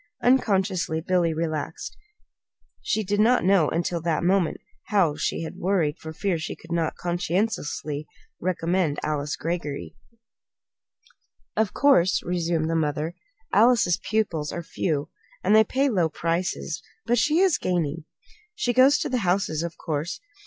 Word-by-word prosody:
Unconsciously 195 -9 +2
Billy 175 0 +1
relaxed. 160 -1 -3 0.9
She 215 - 0
did 205 +1 -1
not 235 -1 +4
know 185 -5 +4
until 170 0 -1
that 165 0 0
moment 180 -1 +2 0.3
how 185 -8 +2
she - - -2
had 160 - -7
worried 170 -5 0
for 160 - -7
fear 175 +1 -1
she 155 - -5
could - - -15
not, 165 -2 0
conscientiously, 175 -4 -2 0.3
recommend 170 -3 0
this - - -4
Alice 150 -1 -1
Greggory. 165 -4 -4 1.6
"Of 220 -3 0
course," 225 -11 +4
resumed 170 -2 0
the 165 - 0
mother, 155 +1 -1 0.4
"Alice's 210 -5 +4
pupils 180 -9 -1
are 170 - -5
few, 155 -2 -2 0.3
and 205 +3 +4
they 220 - +8
pay 270 +6 +1
low 180 -10 +2
prices; 170 +3 -2 0.2
but 240 0 +2
she 300 +6 +2
is 375 -2 +3
gaining. 165 -3 -1 0.5
She 245 -13 0
goes 265 +4 +6
to - - -1
the 250 -2 0
houses, 180 -5 0
of 170 0 -5
course. 155 +2 -3
175 Hz, 145 wpm, -25 LUFS, 160-205 Hz, 1.6 s, they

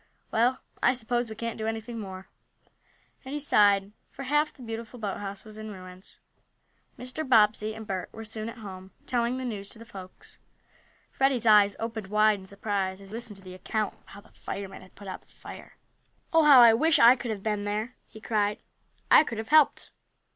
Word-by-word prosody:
Well, 240 +3 +2 0.2
I 245 - +4
suppose 240 -1 -2
we 220 - -7
can't 230 +1 -5
do 220 - -2
anything 225 +1 -4
more," 190 -2 -8 1.0
and 270 +2 -6
he - - -2
sighed, 205 -7 +3 0.2
for 275 - -9
half 295 +3 +1
the 255 - -14
beautiful 225 +1 -7
boathouse 200 -1 -5
was 215 -1 -11
in 215 0 -7
ruins. 185 -1 -12 0.8
Mr. 255 +5 -5
Bobbsey 215 -4 +3
and 220 0 -8
Bert 190 -3 -4
were 225 0 -9
soon 220 +1 -5
at 230 - -10
home, 190 -3 -9 0.2
telling 245 0 0
the 260 - -4
news 200 -4 -5
to - - -5
the 230 - -12
folks. 185 -4 -12 0.7
Freddie's 265 -4 +1
eyes 210 -2 +6
opened 225 -3 -4
wide 210 0 +3
in 190 - -13
surprise 200 -1 -2
as 195 0 -13
he - - -6
listened 230 -3 -6
to 195 - -15
the 185 -1 -10
account 205 +3 -2
of - - -30
how 200 - -12
the - - -22
firemen 195 -1 -7
had 185 - -17
put 200 - -12
out 185 - -6
the - - -31
fire. - - -12 0.6
"Oh, 325 -1 +6
I 250 -6 +9
wish 310 +7 +3
I 235 +2 +8
could 245 -1 -6
have 205 -3 -4
been 210 -2 -1
there!" 215 +4 -2
he 220 - -13
cried. 210 -2 0 0.5
"I - - +9
could 230 -7 -6
have 220 0 -5
helped." 310 -2 +4
220 Hz, 200 wpm, -27 LUFS, 200-240 Hz, 1.0 s, I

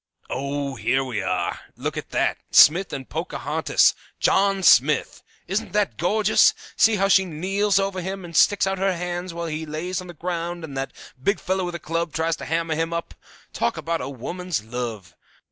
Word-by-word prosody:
"Ah, 140 +1 -2
here 135 +3 +1
we 130 -4 -3
are! - - -1 0.2
Look - - -4
at - - -6
that! - - 0
Smith 175 +6 +6
and 135 -2 -6
Pocahontas! - - +1 0.3
John 195 0 +2
Smith! 150 -2 +4 0.3
Isn't 195 +4 -2
that 210 -1 0
gorgeous? 210 +4 +4 0.2
See 225 -1 +5
how 195 -1 +2
she 190 -1 +5
kneels 195 +4 0
over 195 -1 0
him, 190 +1 -5
and 170 -1 -10
sticks 205 +4 +5
out 195 -1 -1
her 190 -2 +1
hands 175 +1 -4
while 170 0 -5
he 160 -1 -4
lays 160 +4 -4
on 180 - -10
the 175 - -10
ground 170 +1 -4
and 145 -4 -7
that 135 0 -3 0.3
big 200 +9 +1
fellow 190 0 -1
with 175 -1 -4
a - - -4
club 165 +1 -2
tries 160 0 0
to - - -7
hammer 165 0 -1
him 165 +1 -1
up. 170 -1 -4 0.4
Talk - - -1
about 165 0 -2 0.2
woman's 175 - -3
love! 110 -6 -5
170 Hz, 185 wpm, -23 LUFS, 155-190 Hz, 0.4 s, Smith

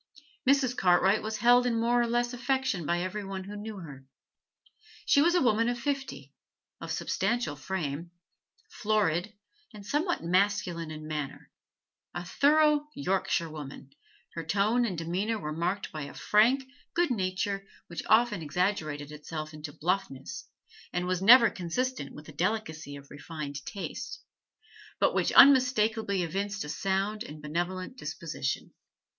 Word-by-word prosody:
Mrs. 270 -3 +3
Cartwright 190 +2 +4
was 215 0 -3
held 245 +2 +5
in 230 -2 +1
more 240 +1 +3
or 235 - +1
less 240 +1 0
affection 260 - -1
by 175 +1 +1
every 195 +3 -4
one 195 -1 -5
who 200 +2 -8
knew 210 0 -6
her. 145 -7 -10 1.0
She 285 - +5
was 345 +3 +4
a 355 - +4
woman 230 -1 +3
of 245 - -1
fifty, 235 - -4 0.5
of - - -6
substantial 205 -5 -1
frame, 160 0 -4 0.6
florid, 210 - 0 0.4
and 205 -1 -10
somewhat 315 - 0
masculine 180 -2 +1
in 155 0 -7
manner; 150 -3 -5 0.6
a 175 - -4
thorough 295 - +3
Yorkshire 190 -9 0
woman, 140 -2 -9 0.4
her 165 - -4
tone 210 +9 +2
and 190 -7 -3
demeanour 185 +7 -1
were 155 -7 -4
marked 180 +5 -2
by 155 -2 -5
a 140 - -10
frank 235 +6 +3 0.3
good 345 -4 +2
nature 195 -1 -1 0.2
which 170 -2 -6
often 220 -4 +4
exaggerated 155 -3 -1
itself 155 +1 -6
into 150 0 -7
bluffness, 180 - -3 0.4
and 180 0 -1
was 180 0 -1
never 230 +3 +8
consistent 185 - -3
with 150 - -11
the - - -10
delicacy 160 -3 -2
of 140 0 -13
refined 145 -1 -6
taste, 200 - -6 0.8
but - - +3
which - - +1
unmistakably 225 -7 +5
evinced 200 +5 -2
a 150 - -7
sound 195 +6 -1
and 150 +1 -9
benevolent 175 - -3
disposition. 155 - -4
195 Hz, 145 wpm, -29 LUFS, 160-235 Hz, 1.0 s, never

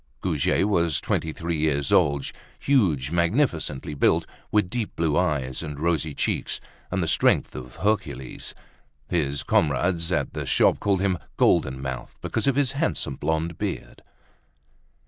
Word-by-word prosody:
Goujet 85 +1 +1
was 85 -8 +2
twenty 80 - -1
three 85 +1 -3
years 70 -3 0
old, 70 -1 +3 0.3
huge, 85 - +2
magnificently 85 - 0
built, 70 - +2 0.3
with 105 -3 +3
deep 115 +1 -4
blue 80 -3 +1
eyes 70 -8 0
and 75 -3 -6
rosy 80 -2 0
cheeks, - - -1 0.3
and - - 0
the - - -1
strength - - +2
of 65 -1 -8
Hercules. 100 -10 -2 0.6
His 70 -5 0
comrades 85 +4 +1
at 75 -6 0
the - - -4
shop - - +3
called 100 -2 +1
him 95 -3 +1 0.2
"Golden 65 0 +3
Mouth" 65 -1 -6
because - - -2
of 140 - +3
his 140 -2 +2
handsome 85 - -1
blonde 80 +2 -1
beard. - - -4
80 Hz, 145 wpm, -25 LUFS, 70-90 Hz, 0.6 s, old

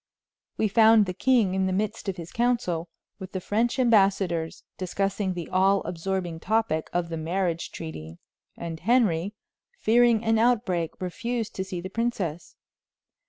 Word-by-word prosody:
We 220 - +2
found 220 0 +6
the 185 - -4
king 225 -1 +2
in 190 0 +1
the - - -1
midst 210 +2 -2
of 190 - -4
his 170 -1 -8
council, 230 -9 0 0.3
with 190 -1 -9
the 190 - -2
French 225 +7 0
ambassadors, 195 -8 +2
discussing 195 +1 -2
the 170 -2 -5
all 190 +1 +3
absorbing 180 -1 -3
topic 210 -5 0
of 175 -1 -1
the 165 - -4
marriage 170 +1 -2
treaty; 80 - -8 0.4
and 165 -1 -6
Henry, 205 -3 +2 0.4
fearing 235 0 +4
an 225 0 +3
outbreak, 210 -9 +1
refused 230 +5 -3
to 190 - -3
see 185 -2 -5
the 185 - -5
princess. 190 -7 -3
190 Hz, 150 wpm, -26 LUFS, 175-225 Hz, 0.4 s, found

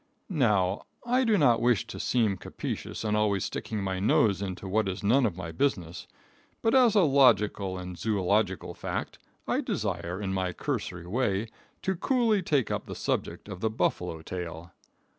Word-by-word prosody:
Now, 105 - +1 0.2
I 250 +2 +2
do 225 -4 +3
not 120 -8 +4
wish 120 -5 +3
to - - -8
seem 110 -5 +1
captious 90 - -5
and 105 -1 0
always 105 -3 +1
sticking 105 -3 -4
my 95 -1 -2
nose 100 -1 +3
into 95 -1 -5
what 105 +2 +1
is 95 +2 -5
none 120 +5 +4
of 90 -5 -5
my 90 -3 -5
business, 85 - -1 0.6
but 225 - +3
as 250 -5 +5
a 205 - +6
logical 105 - +3
and 90 0 -6
zoological 100 -2 0
fact, - - -4 0.3
I - - +1
desire, 90 +3 -3
in 95 -2 -2
my 95 -1 -1
cursory 85 0 -3
way, 105 +1 0 0.3
to 190 - 0
coolly 230 0 +2
take 145 -8 +1
up - - -3
the - - -6
subject - - -2
of 95 -3 -7
the 110 - 0
buffalo 80 -6 -1
tail. 85 -1 -6
105 Hz, 170 wpm, -28 LUFS, 95-130 Hz, 0.6 s, a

